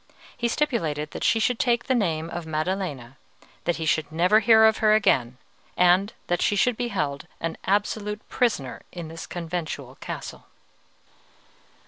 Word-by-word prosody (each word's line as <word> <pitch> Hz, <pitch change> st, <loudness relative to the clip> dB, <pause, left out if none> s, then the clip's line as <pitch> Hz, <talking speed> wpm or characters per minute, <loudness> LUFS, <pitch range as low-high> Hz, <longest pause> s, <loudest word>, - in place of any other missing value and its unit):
He 240 Hz, -, -1 dB
stipulated 165 Hz, -, -1 dB
that -, -, -6 dB
she 225 Hz, -, +3 dB
should 230 Hz, +2 st, +1 dB
take 240 Hz, -1 st, +2 dB
the 260 Hz, -, +1 dB
name 165 Hz, -9 st, 0 dB
of 170 Hz, -2 st, -5 dB
Maddelena, 155 Hz, -6 st, -3 dB, 0.5 s
that 175 Hz, -, +1 dB
he 165 Hz, -, -4 dB
should 155 Hz, -1 st, 0 dB
never 180 Hz, +7 st, +4 dB
hear 220 Hz, 0 st, +6 dB
of 220 Hz, 0 st, +4 dB
her 215 Hz, -1 st, +4 dB
again, 125 Hz, -, +2 dB, 0.4 s
and 180 Hz, +3 st, +4 dB
that 175 Hz, -, 0 dB
she 205 Hz, -, +2 dB
should 245 Hz, +4 st, +2 dB
be 245 Hz, +1 st, -2 dB
held 150 Hz, -10 st, -3 dB
an 165 Hz, 0 st, -3 dB
absolute 210 Hz, +1 st, -1 dB
prisoner 175 Hz, -, -1 dB
in 170 Hz, -3 st, -7 dB
this 165 Hz, 0 st, -8 dB
conventual 165 Hz, -6 st, -5 dB
castle. -, -, -7 dB
180 Hz, 155 wpm, -25 LUFS, 155-220 Hz, 0.5 s, hear